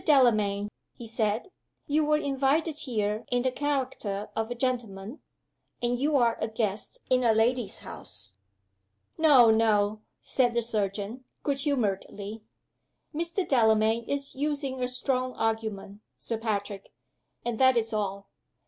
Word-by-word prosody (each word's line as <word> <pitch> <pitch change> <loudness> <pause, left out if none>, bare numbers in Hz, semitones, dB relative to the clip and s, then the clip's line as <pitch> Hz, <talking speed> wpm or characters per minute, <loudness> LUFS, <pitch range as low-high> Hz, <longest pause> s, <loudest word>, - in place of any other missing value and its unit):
Delamayn," 215 -8 +4 0.3
he 235 - -9
said, 225 - -1 0.3
"you 305 +2 +2
were 300 0 +3
invited 285 +2 +1
here 215 -4 -1
in 245 0 +1
the 260 - +1
character 260 -8 -2
of 225 +1 -1
a 245 - -3
gentleman, 235 -2 -3 0.6
and 240 0 0
you 295 +2 +1
are 235 -3 +2
a - - +1
guest 220 - -3
in 255 0 +4
a 230 -2 +5
lady's 230 -1 +1
house." 100 -1 -10 0.9
"No! 270 -8 +7
no!" 215 -1 +2 0.2
said 245 -3 +1
the 235 - +2
surgeon, 215 +2 -3 0.2
good 280 -2 0
humoredly. 215 -5 -2 0.7
"Mr. 335 +4 -1
Delamayn 220 -2 +3
is 280 0 -2
using 280 -2 -2
a - - +1
strong 255 0 -1
argument, 215 -2 -2 0.2
Sir 230 -2 -4
Patrick 205 -3 -3 0.5
and 240 -2 -2
that 260 -2 +6
is 225 -1 0
all. 200 -2 -2
235 Hz, 135 wpm, -28 LUFS, 215-265 Hz, 0.9 s, No